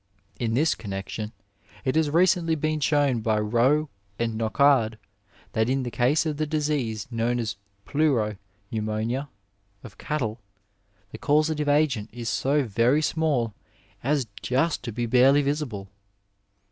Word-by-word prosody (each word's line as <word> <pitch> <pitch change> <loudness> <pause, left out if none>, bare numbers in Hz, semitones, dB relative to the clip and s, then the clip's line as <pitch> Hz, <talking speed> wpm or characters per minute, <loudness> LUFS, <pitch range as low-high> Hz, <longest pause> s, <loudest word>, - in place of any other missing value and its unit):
In 115 -2 0
this 155 +5 +3
connexion 105 +1 -5 0.5
it 130 - +1
has 160 -2 +3
recently 170 0 +3
been 155 0 -1
shown 145 -4 +2
by 110 -1 +1
Roux 120 +8 +2 0.3
and 115 -1 -1
Nocard 115 0 +3 0.6
that 110 +2 +1
in 135 0 +1
the 120 - -4
case 130 +8 +2
of 155 -2 -2
the 155 0 -1
disease 145 -8 -1
known 115 +1 0
as 115 -3 -2 0.3
pleuro 120 -7 +1 0.3
pneumonia 110 +5 -2 0.5
of 110 -4 -12
cattle 120 -7 -2 0.7
the - - -8
causative 150 0 +2
agent 145 -8 +2
is 115 -1 -5
so 140 +5 +1
very 120 +6 +2
small 145 -9 0 0.5
as 140 0 +1 0.2
just 135 +6 +1
to 120 - -3
be 120 +2 -2
barely 130 +4 +5
visible. 140 -9 -2
130 Hz, 135 wpm, -25 LUFS, 115-150 Hz, 0.7 s, barely